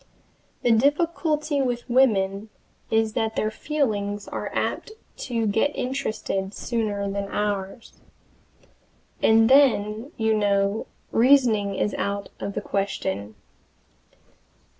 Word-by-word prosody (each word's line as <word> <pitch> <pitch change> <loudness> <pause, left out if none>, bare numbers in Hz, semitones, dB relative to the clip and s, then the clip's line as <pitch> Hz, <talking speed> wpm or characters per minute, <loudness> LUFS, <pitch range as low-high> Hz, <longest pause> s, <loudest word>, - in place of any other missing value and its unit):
The 240 - +3
difficulty 300 +3 +1
with 245 -2 -2
women 215 -5 +2 0.4
is 220 -1 +1
that 220 0 -1
their 215 - 0
feelings 210 -7 -2
are - - -4
apt 435 - -2 0.3
to 230 -3 -1
get 220 +8 +1
interested 215 -7 -3
sooner 210 -4 -2
than 200 0 -3
ours, 205 +2 -3 1.3
and 225 0 +5
then, 245 -2 +3
you 220 -1 +2
know, 200 0 +1 0.2
reasoning 230 -6 +4
is 205 - -1
out 200 0 -2
of 200 - -4
the 210 - -3
question. 190 - -3
220 Hz, 105 wpm, -24 LUFS, 200-250 Hz, 1.3 s, and